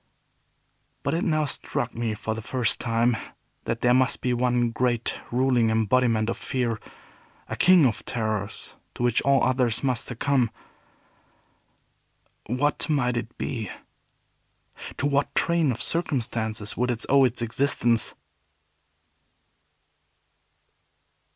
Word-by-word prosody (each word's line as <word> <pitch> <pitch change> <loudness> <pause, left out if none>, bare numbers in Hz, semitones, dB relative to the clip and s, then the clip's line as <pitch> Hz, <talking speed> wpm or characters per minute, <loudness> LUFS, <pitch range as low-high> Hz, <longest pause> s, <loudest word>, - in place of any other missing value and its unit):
But - - 0
it 170 +3 0
now 155 -6 +1
struck 120 -3 -2
me, 115 -2 -2
for 110 +1 -3
the 110 - -6
first 120 +1 0
time, 115 0 +1 0.5
that 115 - -2
there 125 0 +4
must 130 +1 +2
be 125 - 0
one 120 -1 +1
great 120 0 0
and - - -12
ruling 125 -2 +2
embodiment 110 0 +2
of 115 - -3
fear, 120 -4 -2 0.7
a - - -4
King 180 -4 +6
of 120 - 0
Terrors, 110 -3 -3 0.2
to - - -4
which 120 -2 +2
all 140 0 +3
others 125 -2 +1
must 125 -4 0
succumb. 125 0 +1 2.0
What 145 +7 0
might 125 -5 +1
it 120 0 -5
be? 110 -6 -3 1.3
To - - -2
what 140 0 0
train 170 -4 +2
of 120 - -2
circumstances 115 -9 -2
would 125 +1 0
it 120 -2 -1
owe 140 0 +5
its 120 -1 0
existence? 120 -1 +1
120 Hz, 125 wpm, -25 LUFS, 115-135 Hz, 2.0 s, King